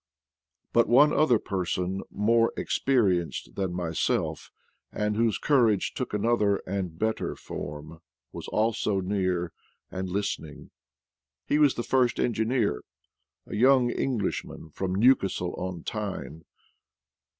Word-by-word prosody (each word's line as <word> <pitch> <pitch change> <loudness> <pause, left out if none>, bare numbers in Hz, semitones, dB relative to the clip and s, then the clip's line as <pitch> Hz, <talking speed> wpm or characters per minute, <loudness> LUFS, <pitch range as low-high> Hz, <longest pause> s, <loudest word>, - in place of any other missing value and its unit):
But 115 - +4
one 140 +5 +6
other 140 -6 +4
person, 95 -1 -2
more 115 +2 +2
experienced 95 -11 0
than 95 -3 -2
myself, 85 -3 -1 0.4
and 105 0 -1
whose 115 -1 +1
courage 115 -9 +2
took 130 - -4
another 105 -1 +2
and 90 -4 -4
better 110 +4 -1
form, 75 +2 -8 0.3
was - - -8
also 110 -2 0
near 90 -3 -1 0.4
and 95 0 -4
lis 100 +2 -1
tening. 75 -2 -12 0.7
He 150 - +1
was 145 -3 +4
the 120 - -3
first 125 -2 +1
engineer 110 - 0 0.3
— - - -56
a - - -7
young 125 +2 +4
Eng 130 0 -1
lishman 80 -6 -4
from 95 -1 -2
Newcastle 95 -6 +2
on 90 -2 -5
Tyne. 100 -7 -5
105 Hz, 125 wpm, -27 LUFS, 90-120 Hz, 0.7 s, one